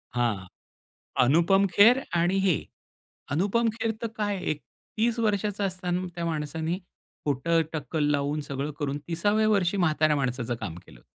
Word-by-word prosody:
हां. 110 -6 0 0.8
अनुपम 170 +9 +4
खेर 235 +6 +7 0.2
आणि 175 +3 +2
हे 180 - +4 0.8
अनुपम 205 +9 +2
खेर 225 -1 0
तर 230 - -1
काय 205 -2 0
एक 150 - -5 0.4
30 230 +2 +1
वर्षाचा 205 -2 0
असताना 180 -1 -2
त्या 170 - -3
माणसांनी 160 +1 -2 0.5
खोटं 160 +4 +2
टक्कल 150 +1 -2
लावून 145 +1 0
सगळं 140 +2 -3
करून 145 -1 -1
30व्या 205 +6 +2
वर्षी 200 -2 +2
म्हाताऱ्या 155 -4 +3
माणसाचं 125 -2 -1
काम 80 - -4
केलं. - - -16
170 Hz, 140 wpm, -27 LUFS, 145-200 Hz, 0.8 s, खेर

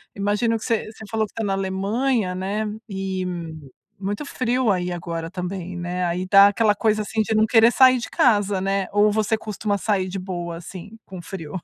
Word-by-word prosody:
Imagino 210 +3 0
que 220 - -9
você 230 -2 -1
você 220 0 -12
falou 220 -1 +1
que - - -26
está 225 - -4
na 200 - -1
Alemanha, 195 +3 0
né, 195 +4 -2 0.2
e, 190 -2 -3 0.7
muito 205 +7 -3
frio 250 -4 0
aí 180 -1 -1
agora 165 -1 -5
também, 180 0 -5
né, 175 +1 -2
aí 175 +1 -2
dá 195 +1 +8
aquela 210 +1 +2
coisa, 215 0 +1
assim, 220 +1 -1
de 215 - -1
não 215 0 +4
querer 230 +1 +5
sair 255 -1 +6
de 240 - -5
casa, 205 -5 +2
né, 195 0 0
ou 210 +1 +4
você 220 +1 +1
costuma 210 -1 -2
sair 195 -2 0
de 190 +1 -5
boa, 175 -2 -5
assim, 185 +5 -10
com 185 -2 -9
frio? 170 -1 -7
200 Hz, 195 wpm, -22 LUFS, 185-220 Hz, 0.7 s, dá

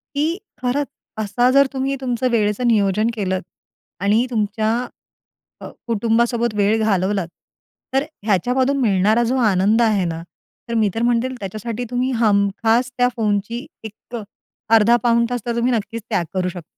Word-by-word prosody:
की 315 +5 0 0.2
खरंच 265 +3 0 0.3
असा 220 +4 +1
जर 275 +1 +5
तुम्ही 270 +1 -1
तुमचं 250 -1 -1
वेळेचं 215 +1 +1
नियोजन 210 -1 +2
केलंत 190 -4 -2 0.6
आणि 215 +4 +3
तुमच्या 215 0 0 0.9
अ, - - -8 0.2
कुटुंबासोबत 235 +1 +1
वेळ 210 +2 +2
घालवलात, 195 -3 0 0.7
तर 270 - +3
अ, - - -7 0.2
ह्याच्यामधून 250 +7 +1
मिळणारा 215 +1 +3
जो 255 +3 0
आनंद 200 +5 +3
आहे 210 -5 +2
ना, 165 -1 -4 0.5
तर 235 - -3
मी 210 - +3
तर 225 - -2
म्हणते 240 +1 +2
त्याच्यासाठी 215 +4 -5
तुम्ही 250 +1 0
हमखास 225 +3 +2
त्या 245 0 +4
फोनची 220 +4 -1 0.2
एक 220 +2 -9
अ, 220 - -5 0.5
अर्धा-पाऊण 235 +1 +4
तास 245 - -2
तर 235 0 -1
तुम्ही 245 +2 +1
नक्कीच 230 0 -3
त्याग 180 -5 +1
करू 185 -1 0
शकता. 175 -1 -7
225 Hz, 150 wpm, -20 LUFS, 205-245 Hz, 0.9 s, जर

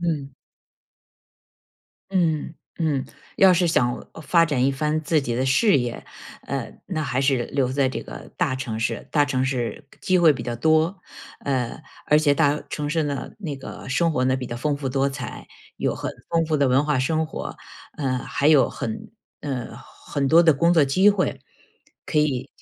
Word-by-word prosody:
嗯。 145 -6 -2 1.8
嗯， 160 -4 0 0.2
嗯， 150 -5 0 0.3
要 190 -1 +7
是 175 0 +2
想 120 -7 0 0.2
发 170 +1 +4
展 130 -5 +1
一 135 - +3
番 150 +3 -1
自 155 0 +2
己 120 -3 -3
的 130 +2 0
事 180 - +4
业， 120 -1 -4 0.4
呃， - - -4
那 155 - -2
还 130 -2 -1
是 135 -3 +2
留 135 -3 0
在 135 -1 +2
这 130 - -4
个 - - -10
大 130 - 0
城 120 -4 -4
市。 115 - -3
大 145 -2 +3
城 130 -2 0
市 130 +1 -3
机 185 - +2
会 165 -3 +6
比 120 - -6
较 120 -1 -3
多， 160 - +2 0.4
呃， 130 0 -2 0.3
而 150 - +5
且 150 -2 +3
大 145 0 +2
城 150 -1 -3
市 160 +1 +1
呢， 140 -3 -4
那 155 -9 -5
个 135 - -9
生 160 +5 +1
活 130 -2 +1
呢， 130 0 +2
比 125 -1 -5
较 120 - -5
丰 145 +3 -1
富 140 -2 -3
多 135 +1 +1
彩， - - -7 0.3
有 - - -1
很 - - -4 0.2
丰 165 -1 +2
富 155 -1 +1
的 140 -2 +2
文 135 +3 +3
化 150 -3 +1
生 160 +4 0
活， - - -6 0.4
呃， 130 -3 0
还 140 - -1
有 150 -3 +5
很 110 -1 -5 0.3
呃， 125 -5 -5
很 140 +2 -4
多 165 +3 +7
的 160 -3 +6
工 170 +5 +3
作 160 -4 +5
机 190 +10 +4
会， 195 -3 -1 0.6
可 150 - 0
以， 135 -3 -1
140 Hz, 200 characters per minute, -23 LUFS, 130-160 Hz, 1.8 s, 要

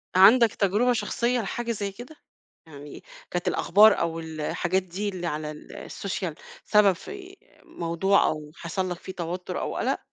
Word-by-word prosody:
عندك 220 +5 +7
تجربة 215 +6 +2
شخصية 240 +1 0
لحاجة 235 +3 -3
زي 205 -3 -3
كده؟ 245 +10 -11 0.5
يعني 145 -1 -11 0.3
كانت 175 0 -2
الأخبار 205 +4 +5
أو 165 0 -1
الحاجات 165 +3 -2
دي 190 +3 -4
اللي 180 -3 -4
على 150 -1 -3
ال 150 - -10
الsocial 190 -4 -4 0.3
سبب 210 -3 +5
في 385 - -10 0.3
موضوع 170 +4 +1
أو 150 -1 -4
حصل 185 +2 -3
لك 175 - -3
فيه 190 - -8
توتّر 180 +1 -4
أو - - -3
قَلَق؟ - - 0
190 Hz, 155 wpm, -26 LUFS, 170-215 Hz, 0.5 s, عندك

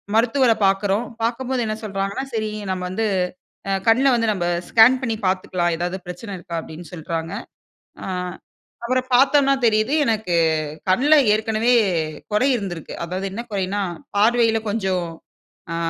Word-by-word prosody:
மருத்துவர 245 +2 +3
பாக்குறோம். 195 +3 +1 0.2
பார்க்கும்போது 250 +2 -1
என்ன 215 - -2
சொல்றாங்கனா, 200 +4 -3
சரி, 215 -1 -1 0.2
நம்ம 185 -1 -2
வந்து, 220 +4 -1 0.6
அ - - 0 0.2
கண்ல 250 +5 +5
வந்து 230 -2 +1
நம்ப 175 -3 -2 0.2
ஸ்கேன் 245 +3 +6
பண்ணி 230 -3 -1
பாத்துக்கலாம். 180 -2 0
எதாவது 175 +2 -2
பிரச்சன 180 +4 -7
இருக்கா? 170 -1 -6
அப்டின்னு 160 0 -11
சொல்றாங்க. 165 +1 -4 0.7
அ, - - -5 0.8
அப்றம் 255 +1 -1
பாத்தோம்னா 275 +1 +5
தெரியுது, 215 +5 +2
எனக்கு 220 -6 0 0.5
கண்ல 270 +11 +4 0.2
ஏற்கனவே 220 +2 +1 0.6
கொறை 230 +6 +3
இருந்திருக்கு. 180 -7 -5
அதாவது 185 +3 -3
என்ன 225 - -4
குறைனா 200 +1 -1 0.4
பார்வையில 225 +1 +3
கொஞ்சம், 190 -4 -1 0.7
அ - - -2
215 Hz, 130 wpm, -21 LUFS, 185-235 Hz, 0.8 s, ஸ்கேன்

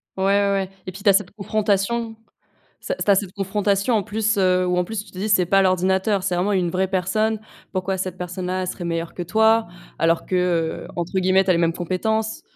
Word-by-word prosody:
Ouais, 190 - -2
ouais, 200 0 +3
ouais 195 -1 -1 0.2
et 185 - -3
puis, 195 +3 -11
tu 205 - +5
as - - +6
cette 195 -2 +1
confrontation. 215 +2 -1 0.7
Ça, - - -3
c - - -2
tu 205 - +3
as - - +6
cette 190 -1 -2
confrontation, 200 +3 0
en 205 - +1
plus, 215 +1 0
heu, 185 -1 +3
où, 180 0 0
en 180 - +2
plus, 210 +2 -4
tu - - -17
te 185 - -13
dis: 205 +3 -2
«C'est 185 -4 +4
pas 195 +2 +4
l'ordinateur, 190 +1 +1
c'est 180 -2 0
vraiment 195 +4 +1
une 180 -2 +1
vraie 185 +2 0
personne». 215 +4 0 0.3
Pourquoi 190 +1 -1
cette 185 -1 -4
personne-là, 180 +1 -3
elle 185 - -3
serait 175 -1 -5
meilleure 165 0 -3
que 175 - -4
toi? 220 +4 +3 0.3
Alors 165 0 +1
que, 185 - -2 0.5
heu, - - -10
entre 175 +2 -1
guillemets, 185 +1 +3
«tu 190 - -3
as - - +6
les 170 - +1
mêmes 165 -1 +2
compétences». 220 +6 -2
190 Hz, 240 wpm, -22 LUFS, 180-210 Hz, 0.7 s, as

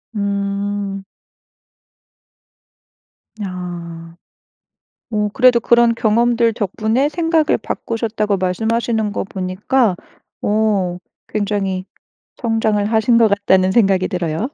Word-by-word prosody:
음. 200 0 -2 2.4
아. 170 -3 -7 1.0
어. 210 -1 0
그래도 255 -2 +5
그런 235 0 +4
경험들 230 +1 +2
덕분에 220 +6 0
생각을 325 -2 +1
바꾸셨다고 215 -3 -2
말씀하시는 220 +3 -1
것 - - -2
보니까 190 +4 0 0.5
어 205 -4 +1 0.3
굉장히 200 -3 -2 0.6
성장을 225 -3 +1
하신 220 +2 +3
것 230 -1 +5
같다는 190 -2 +2
생각이 195 -4 +3
들어요. 180 - -2
210 Hz, 205 characters per minute, -18 LUFS, 190-230 Hz, 2.4 s, 그래도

